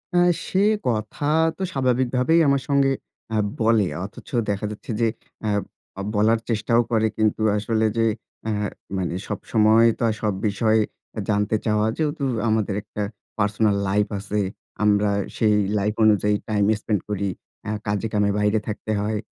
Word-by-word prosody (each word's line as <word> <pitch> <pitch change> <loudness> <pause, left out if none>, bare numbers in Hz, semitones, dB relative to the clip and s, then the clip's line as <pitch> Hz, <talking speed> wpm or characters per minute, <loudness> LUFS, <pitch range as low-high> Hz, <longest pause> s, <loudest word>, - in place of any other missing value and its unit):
আ - - +4 0.3
সে 190 - 0 0.3
কথা 110 +4 -2 0.3
তো - - -9
স্বাভাবিকভাবেই 130 +3 +2
আমার 140 -1 +3
সঙ্গে 140 -1 +4 0.5
আ - - +2 0.2
বলে। 110 -2 +3 0.2
অথচ 105 +8 -12 0.2
দেখা 100 +1 -1
যাচ্ছে 105 - -7
যে 115 - +4 0.4
আ - - +1 0.5
আ - - -2
বলার 110 +2 +3
চেষ্টাও 115 +1 +2
করে, 110 -1 +3
কিন্তু 110 0 +1 0.2
আসলে 110 +1 0
যে 115 - +3 0.4
আ - - 0 0.5
মানে 90 -2 -2
সবসময় 110 +2 +3
তো - - -1 0.2
সব 105 -2 +1
বিষয়ে 110 +2 +2 0.4
এ - - -1
জানতে 105 +1 +1
চাওয়া 105 0 +2
যেহেতু 150 -2 -1 0.3
আমাদের 110 -2 +1
একটা 105 0 -7 0.4
পার্সোনাল 105 0 +2
লাইফ 105 +2 +2
আছে 100 +1 -2 0.4
আমরা 105 0 +3 0.3
সেই 105 -2 +3 0.2
লাইফ 105 +1 0
অনুযায়ী 105 -1 +4
টাইম 105 -2 +2
স্পেন্ড 105 -4 -1
করি। 100 -1 -1 0.3
অ্যাঁ 105 0 -3
কাজে-কামে 105 0 0
বাইরে 105 +1 +2
থাকতে 110 0 -4
হয়। 105 +1 -1
110 Hz, 150 wpm, -23 LUFS, 105-115 Hz, 0.5 s, আ